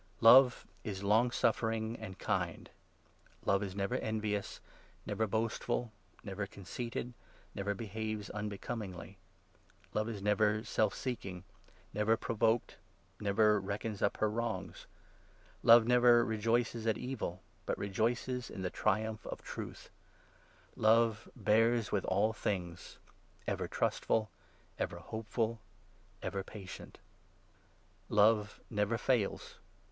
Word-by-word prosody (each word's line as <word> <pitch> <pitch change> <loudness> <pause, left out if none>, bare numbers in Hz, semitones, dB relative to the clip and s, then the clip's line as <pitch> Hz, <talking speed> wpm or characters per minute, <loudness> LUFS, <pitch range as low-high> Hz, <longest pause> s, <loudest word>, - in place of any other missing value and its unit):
Love 125 +2 +8 0.2
is 100 -2 -4
long 110 +5 +4
suffering, 115 -2 0
and 95 -4 -7
kind; - - -2 0.7
Love 100 +1 +3
is 100 -2 -4
4 - - -11
never 100 +5 0
envious, 105 -3 -2 0.5
never 110 - 0
boastful, 115 +2 -1 0.3
never 100 0 -4
conceited, 120 +6 -5 0.4
never 100 +1 -2
behaves 110 0 -4
5 - - -9
unbecomingly; 105 -2 -5 0.7
Love 110 +1 0
is 110 -3 -4
never 105 +1 +2
self 110 -3 +1
seeking, 95 -8 -4 0.5
never 105 +2 +2
provoked, 115 +1 0 0.4
never 105 +1 +3
reckons 100 +2 -4
up 100 - +1
her 110 - +2
wrongs; 115 +1 -3 0.7
Love 115 0 +8
never 120 -1 +6
rejoices 115 +1 0
at 110 - +2
evil, 115 -8 -4 0.2
but - - +1
6 - - -9
rejoices 120 +5 -1
in 95 - -6
the 90 - -2
triumph 110 +1 0
of - - -6
Truth; - - -7 0.8
Love 110 0 +3
bears 115 +1 +3
with 100 - 0
all 105 +4 +2
things, 90 -5 -4 0.5
7 - - -1
ever - - -3
trustful, 110 -3 0 0.5
ever - - -2
hopeful, 110 +1 -3 0.6
ever 95 -1 -2
patient. 95 -2 -9 1.1
Love 105 0 +3
never 105 +1 +1
8 - - -4
fails. 120 -7 0
110 Hz, 120 wpm, -34 LUFS, 100-115 Hz, 1.1 s, Love